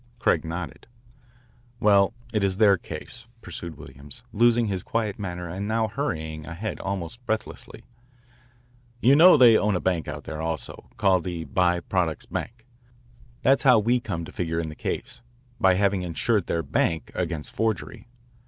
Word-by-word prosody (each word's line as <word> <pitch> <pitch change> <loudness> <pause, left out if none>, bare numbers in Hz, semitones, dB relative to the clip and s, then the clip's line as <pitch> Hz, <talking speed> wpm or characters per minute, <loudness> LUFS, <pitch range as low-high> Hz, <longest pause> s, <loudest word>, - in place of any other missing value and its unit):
Craig - - +2
nodded. 85 -2 -6 0.9
"Well, 100 -1 +4 0.2
it 105 -2 +1
is 95 -1 +1
their 100 -2 +6
case," 95 +8 -7 0.2
pursued 85 -2 -7
Williams, 70 - -10
losing 120 +1 +4
his 95 -3 -2
quiet 110 -1 -2
manner 90 -3 -5
and 95 +4 -4
now 110 0 +1
hurrying 80 - -4
ahead 95 +6 -5
almost 100 +4 -5
breathlessly. 110 0 -4 1.2
"You 130 +3 +5
know 175 +5 +8
they 120 -3 +8
own 105 -1 +1
a - - +1
bank 90 -3 -1
out 75 -1 -6
there 80 0 -6
also, 80 0 -5
called 95 -4 +3
the 85 -2 -4
By 90 +3 +1
Products 85 -4 -1
Bank. 115 0 -6 0.8
That's 135 +1 +4
how 125 -4 +6
we 120 +4 +2
come 90 -8 -4
to - - -10
figure 80 -2 -3
in 85 -1 -2
the 75 - -9
case, - - -4 0.4
by 95 -1 +5
having 100 0 +2
insured 90 +3 0
their 85 -1 -1
bank 80 0 -1
against 85 -4 -3
forgery. 110 +1 -2
95 Hz, 160 wpm, -25 LUFS, 85-110 Hz, 1.2 s, know